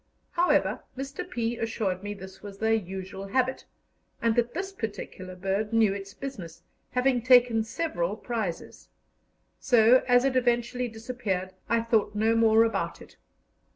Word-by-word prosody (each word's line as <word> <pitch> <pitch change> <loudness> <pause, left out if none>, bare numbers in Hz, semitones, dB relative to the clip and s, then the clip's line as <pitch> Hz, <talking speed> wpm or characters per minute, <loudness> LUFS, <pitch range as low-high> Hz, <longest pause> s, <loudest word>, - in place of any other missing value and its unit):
However, 350 +1 +2 0.2
Mr. 275 +1 -5
P. 235 0 -2
assured 210 -5 -2
me 205 +1 -5
this 190 -1 -11
was 200 -1 -9
their 220 +2 +2
usual 190 -1 -4
habit, 260 +5 0 0.5
and 230 -1 +1
that 240 +2 0
this 385 +2 -3
particular 205 - -6
bird 195 +3 -1
knew 225 -3 +4
its 195 0 -8
business, 220 -12 -8 0.3
having 250 -1 +1
taken 245 -2 +5
several 215 - -2
prizes; 220 -8 -5 0.7
so, 245 -1 +5
as 245 +1 +5
it 270 -1 +1
eventually 245 0 +1
disappeared, 220 -5 -4 0.2
I 230 0 +3
thought 225 -2 +1
no 220 +2 +2
more 225 0 +5
about 195 -7 -1
it. - - -15
225 Hz, 145 wpm, -27 LUFS, 195-245 Hz, 0.7 s, taken